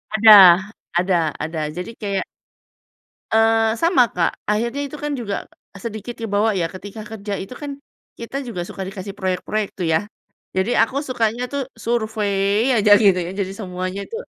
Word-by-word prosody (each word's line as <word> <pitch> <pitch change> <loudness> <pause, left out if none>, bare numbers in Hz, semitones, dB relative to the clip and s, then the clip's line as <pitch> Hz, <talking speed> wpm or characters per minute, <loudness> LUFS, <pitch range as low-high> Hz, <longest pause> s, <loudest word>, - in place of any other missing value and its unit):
Ada, 220 0 +7 0.7
ada 180 +1 +2 0.3
ada. 160 +1 -4 0.2
Jadi 180 +5 -5
kayak 200 -2 -2 1.1
Eee, 225 0 +3
sama 260 -2 +3
Kak. 170 -2 0
Akhirnya 235 +6 0
itu 280 - -9
kan 295 - -1
juga 205 -4 -3 0.5
sedikit 230 +1 -6
kebawa 215 -1 0
ya, 175 -3 0
ketika 205 +3 -9
kerja 210 -1 -5
itu 195 +5 -7
kan 290 -1 -5 0.4
kita 235 +4 -5
juga 180 -7 -4
suka 185 - -8
dikasih 195 0 -7
proyek-proyek 190 +2 -2
tuh 185 - -3
ya? 160 +5 +1 0.5
Jadi 190 +5 +1
aku 275 +5 +1
sukanya 240 -3 -1
tuh 280 -2 -3
survey 220 -1 0
aja 205 0 +7
gitu 200 -3 +4
ya, - - -5
jadi 195 -1 -2
semuanya 185 -1 -5
itu - - -7
210 Hz, 155 wpm, -21 LUFS, 195-230 Hz, 1.1 s, Ada